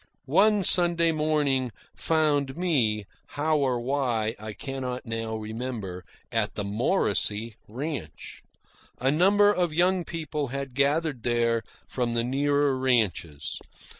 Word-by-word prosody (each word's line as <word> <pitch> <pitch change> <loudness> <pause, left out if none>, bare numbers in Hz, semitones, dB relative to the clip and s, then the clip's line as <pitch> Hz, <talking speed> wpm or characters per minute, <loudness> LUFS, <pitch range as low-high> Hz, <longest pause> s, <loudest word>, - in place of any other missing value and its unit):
One 210 0 +4
Sunday 170 -2 +4
morning 150 -5 +1 0.2
found 150 -3 +1
me, 120 - +1 0.3
how 155 +1 +2
or 130 -3 +1
why 120 -4 -1
I 110 0 -6
cannot 130 0 -5
now 115 -1 -3
remember, 110 -4 -5 0.3
at - - -1
the 105 - -2
Morrisey 110 - 0
ranch. 125 - -6 0.6
A 130 +2 +1
number 205 +6 +5
of 175 -5 0
young 180 +1 +3
people 155 -4 -4
had 135 0 -5
gathered 140 0 +1
there 115 -1 +1 0.2
from 120 -2 -2
the 115 0 +1
nearer 140 +2 +1
ranches. 105 - 0
135 Hz, 120 wpm, -26 LUFS, 115-155 Hz, 0.6 s, number